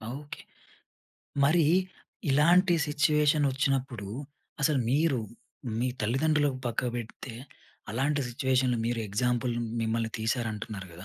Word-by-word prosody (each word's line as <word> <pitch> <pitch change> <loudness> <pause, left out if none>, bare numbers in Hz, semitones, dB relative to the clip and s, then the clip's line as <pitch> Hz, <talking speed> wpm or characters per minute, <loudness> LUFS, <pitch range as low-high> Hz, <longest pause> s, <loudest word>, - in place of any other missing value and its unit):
Okay. 145 +1 -9 1.0
మరి 160 +3 +4 0.7
ఇలాంటి 175 +6 +5
situation 150 0 +3
వచ్చినప్పుడు 130 -5 -1 0.6
అసలు 145 0 +3
మీరు, 145 -1 +2 0.6
మీ 125 +2 +1
తల్లిదండ్రులకు 140 +4 +1
పక్కకు 120 +1 -1
బెడితే, 115 +1 -7 0.6
అలాంటి 140 +6 0
సిట్యుయేషన్‌లో 130 -1 +1
మీరు 120 0 -1
ఎగ్జాంపుల్ 120 +3 0 0.3
మిమ్మల్ని 110 0 -1
తీశారు 115 +1 0
అంటున్నారు 105 -3 -6
కదా! 90 +3 -10
130 Hz, 105 wpm, -29 LUFS, 115-150 Hz, 1.0 s, ఇలాంటి